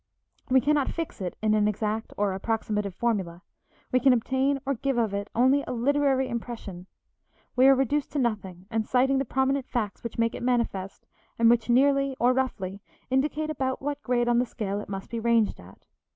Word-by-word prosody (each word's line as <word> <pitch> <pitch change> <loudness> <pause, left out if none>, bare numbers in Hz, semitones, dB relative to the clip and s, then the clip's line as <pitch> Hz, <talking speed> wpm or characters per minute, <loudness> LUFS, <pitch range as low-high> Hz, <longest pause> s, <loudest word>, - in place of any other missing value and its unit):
We 260 0 +5
cannot 290 0 +2
fix 330 -10 -5
it 180 -2 -4
in 215 -1 +3
an 210 -1 +3
exact 215 +1 -2
or 205 -1 +1
approximative 210 -1 -2
formula; 190 -7 -2 0.5
we 255 - +3
can 260 +1 +5
obtain 265 +3 +1
or 275 - +1
give 270 +1 -2
of 225 -4 +1
it 200 +1 -3
only 260 +4 +4
a - - -3
literary 270 +1 +2
impression; 225 -7 -6 0.7
we 255 +1 +6
are 270 - +7
reduced 275 +2 0
to - - -2
nothing 195 -8 -2
and 220 -1 -1
citing 265 +2 +3
the 270 - -1
prominent 265 +1 0
facts 215 -5 -3
which 235 - -6
make 230 0 +1
it - - -6
manifest 235 -6 -1 0.3
and 230 0 +5
which 240 0 +1
nearly, 275 +2 +3
or 245 +1 +4
roughly, 205 -7 -2 0.3
indicate 300 +3 0
about 260 -3 -2
what 290 +1 -4
grade 240 -2 0
on 240 0 +3
the 250 - +2
scale 205 -4 -3
it 210 - -8
must 195 -1 -6
be 230 - -2
ranged 230 -2 +2
at. 90 +2 -16
240 Hz, 195 wpm, -26 LUFS, 210-265 Hz, 0.7 s, are